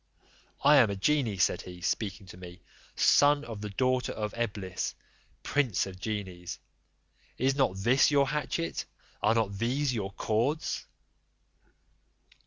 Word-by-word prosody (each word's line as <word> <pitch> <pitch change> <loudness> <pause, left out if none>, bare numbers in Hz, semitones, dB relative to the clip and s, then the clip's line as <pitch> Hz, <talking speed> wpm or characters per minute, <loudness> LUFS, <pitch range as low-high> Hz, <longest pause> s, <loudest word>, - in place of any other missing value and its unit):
"I 145 +1 +7
am 120 -6 +6
a 100 - -2
genie," 115 0 +1
said 90 -1 +2
he, 90 -1 -10
speaking 100 +2 -2
to 95 - -12
me, 90 -1 -11 0.3
"son 145 +1 +4
of 110 -3 -7
the 105 - -4
daughter 130 +4 0
of 105 -1 -4
Eblis, 100 -6 -3 0.5
prince 135 -9 +1
of 95 -1 -9
genies: 95 -5 -5 0.8
is 135 +2 +2
not 135 -9 +2
this 120 +7 +4
your 140 -2 +3
hatchet, 150 +3 -2 0.4
and - - +3
are 115 - +3
not 100 -3 0
these 130 +4 0
your 100 -4 -3
cords?" 120 +11 -1
110 Hz, 140 wpm, -29 LUFS, 95-135 Hz, 0.8 s, I